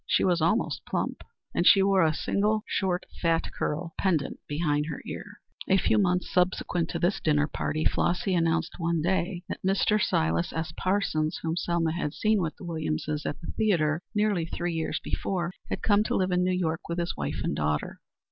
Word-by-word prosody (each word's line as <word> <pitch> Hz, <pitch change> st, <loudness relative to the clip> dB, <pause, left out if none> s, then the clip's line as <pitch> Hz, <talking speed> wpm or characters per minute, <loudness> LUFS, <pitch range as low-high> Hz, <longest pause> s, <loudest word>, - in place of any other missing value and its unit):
She -, -, +3 dB
was 175 Hz, -3 st, +2 dB
almost 170 Hz, +9 st, +1 dB
plump -, -, -2 dB, 0.3 s
and -, -, +1 dB
she 195 Hz, -, +7 dB
wore 195 Hz, -1 st, +4 dB
a 160 Hz, -, +4 dB
single 210 Hz, +6 st, 0 dB
short 185 Hz, -2 st, 0 dB, 0.2 s
fat 165 Hz, -1 st, +1 dB
curl 165 Hz, +2 st, -3 dB
pendent 165 Hz, -8 st, 0 dB
behind 150 Hz, -1 st, 0 dB
her 150 Hz, -, -4 dB
ear. -, -, -8 dB, 0.3 s
A 190 Hz, -, +4 dB
few 195 Hz, -, +3 dB
months 180 Hz, -2 st, +1 dB
subsequent 180 Hz, -1 st, +1 dB
to -, -, -2 dB
this 175 Hz, +4 st, +1 dB
dinner 150 Hz, -2 st, +2 dB
party 155 Hz, +1 st, -2 dB
Flossy 185 Hz, +2 st, +1 dB
announced 165 Hz, 0 st, 0 dB
one 165 Hz, -2 st, 0 dB
day 175 Hz, 0 st, 0 dB
that -, -, -5 dB
Mr. 195 Hz, +2 st, +2 dB
Silas 80 Hz, +1 st, +1 dB
S. 160 Hz, -1 st, -3 dB
Parsons, 185 Hz, -5 st, 0 dB
whom 160 Hz, 0 st, -1 dB
Selma 170 Hz, -2 st, 0 dB
had 160 Hz, -2 st, -3 dB
seen 215 Hz, -2 st, +2 dB
with 160 Hz, -3 st, -2 dB
the -, -, -10 dB
Williamses 155 Hz, -2 st, -2 dB
at -, -, -4 dB
the 165 Hz, -, -6 dB
theatre 170 Hz, -7 st, +1 dB
nearly 205 Hz, -6 st, +1 dB
three 175 Hz, +1 st, -3 dB
years 160 Hz, -1 st, -1 dB
before, 175 Hz, -2 st, -2 dB, 0.2 s
had -, -, -3 dB
come 205 Hz, -1 st, +4 dB
to -, -, 0 dB
live 185 Hz, -1 st, +1 dB
in 180 Hz, 0 st, +2 dB
New 180 Hz, -, +1 dB
York 165 Hz, -3 st, -1 dB
with 170 Hz, -, -2 dB
his 170 Hz, 0 st, -1 dB
wife 70 Hz, 0 st, -3 dB
and -, -, -1 dB
daughter. 75 Hz, 0 st, -2 dB
170 Hz, 195 wpm, -27 LUFS, 155-185 Hz, 0.3 s, she